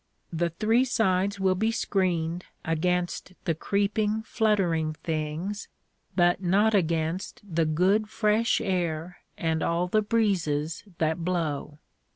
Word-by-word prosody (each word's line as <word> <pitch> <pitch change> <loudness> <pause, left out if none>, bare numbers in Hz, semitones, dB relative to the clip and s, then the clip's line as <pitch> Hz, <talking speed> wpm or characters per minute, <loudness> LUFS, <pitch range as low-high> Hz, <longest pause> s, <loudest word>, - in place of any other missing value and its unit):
The 170 +1 +1
three 220 +8 +2
sides 200 -5 +1
will 190 -1 +3
be 215 +4 +1
screened 180 -6 0 0.2
against 175 +2 -1
the 165 - +2
creeping, 205 +5 0
fluttering 185 -9 +1
things, 160 +6 -3 0.5
but 175 0 +3
not 200 +4 +3
against 165 0 0
the 165 -3 +1
good 190 +7 +2
fresh 215 +1 +2
air 175 -3 -2 0.2
and 160 -1 0
all 170 +1 +1
the 215 +4 +2
breezes 175 -9 0
that 160 +1 0
blow. 160 -4 -2
180 Hz, 120 wpm, -27 LUFS, 165-205 Hz, 0.5 s, will